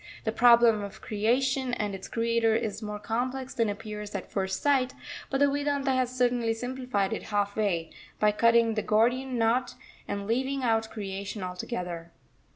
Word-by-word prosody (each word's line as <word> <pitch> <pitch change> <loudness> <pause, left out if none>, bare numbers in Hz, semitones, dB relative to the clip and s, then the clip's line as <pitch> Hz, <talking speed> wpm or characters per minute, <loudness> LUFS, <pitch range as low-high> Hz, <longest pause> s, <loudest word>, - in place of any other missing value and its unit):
The 220 - 0
problem 235 -2 +6
of 200 0 -7
Creation 250 +4 +1
and 210 -4 -2
its 190 -1 -7
Creator 230 -1 +1
is 220 -2 -2
more 210 -1 -4
complex 250 +5 -3
than 230 -2 +1
appears 210 0 -6
at 195 - -5
first 190 -1 -1
sight; 270 -3 +2 0.3
but 270 - 0
the 285 - +5
Vedanta 285 -1 0
has 255 -1 +1
certainly 240 -2 +2
simplified 245 -5 -2
it - - -3
half 205 -1 -1
way, 180 -7 0 0.3
by 210 0 +4
cutting 230 +1 +4
the 215 - 0
Gordian 245 +5 +1
knot 235 +2 +1 0.3
and 200 0 -3
leaving 260 +5 -1
out 225 -2 +1
Creation 200 -1 -5
altogether. 180 -2 -5
225 Hz, 160 wpm, -28 LUFS, 205-250 Hz, 0.3 s, problem